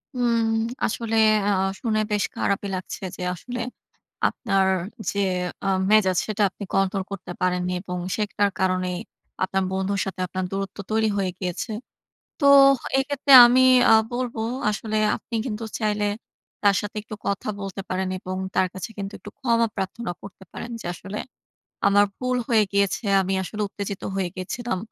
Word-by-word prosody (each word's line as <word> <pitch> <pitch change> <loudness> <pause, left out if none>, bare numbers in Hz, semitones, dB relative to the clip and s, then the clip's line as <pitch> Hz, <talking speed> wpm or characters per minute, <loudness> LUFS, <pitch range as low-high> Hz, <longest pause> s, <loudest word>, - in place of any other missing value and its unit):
উম 240 -2 +2 0.5
আসলে 225 0 -2 0.3
আ - - +3
আ - - +2 0.2
শুনে 220 -3 +1
বেশ 210 -1 +2
খারাপই 200 0 0
লাগছে 185 +1 -6
যে, - - -9
আসলে 245 +7 -6 0.7
আপনার 195 -5 0 0.4
যে 200 - -5 0.5
আ - - -1 0.2
মেজাজ 190 -4 +4
সেটা 215 -1 -1
আপনি 200 - -8
কন্ট্রোল 195 0 +1
করতে 195 -2 -6
পারেননি 180 0 0
এবং 180 -2 -4 0.2
সেটার 205 -1 0
কারণেই 185 -1 0 0.5
আপনার 190 0 +1
বন্ধুর 190 +1 -1
সাথে 190 -1 -6
আপনার 185 +1 -3
দূরত্ব 195 +1 -4
তৈরি 220 0 +2
হয়ে 190 -2 0
গিয়েছে। 180 +5 -3 0.7
তো - - +3 0.5
এক্ষেত্রে 280 +1 0
আমি 250 +2 +5 0.3
আ - - +9 0.2
বলব, 245 -1 -2 0.3
আসলে 215 +1 -2 0.2
আপনি 235 - -7
কিন্তু 225 -2 -4 0.2
চাইলে 210 -1 0 0.6
তার 200 -1 +4
সাথে 205 +1 -7
একটু 215 0 -8
কথা 200 +1 -2
বলতে 195 0 -5
পারেন 185 0 -1
এবং 185 0 -5 0.2
তার 185 - +3
কাছে 190 +3 -6
কিন্তু, 195 +1 -5
একটু 205 - -10
ক্ষমা 230 -2 +2
প্রার্থনা 195 +1 -3
করতে 200 -1 -12
পারেন 235 - -7
যে, - - -10
"আসলে 195 +4 -7 0.7
আমার 205 +1 +5
ভুল 255 0 -1
হয়ে 220 -3 +4
গিয়েছে। 200 +1 +1 0.2
আমি 190 +1 -1
আসলে 210 +3 -5
উত্তেজিত 200 -1 -5
হয়ে 185 -2 -1
গিয়েছিলাম। 185 +3 -3
200 Hz, 155 wpm, -24 LUFS, 190-220 Hz, 0.7 s, আ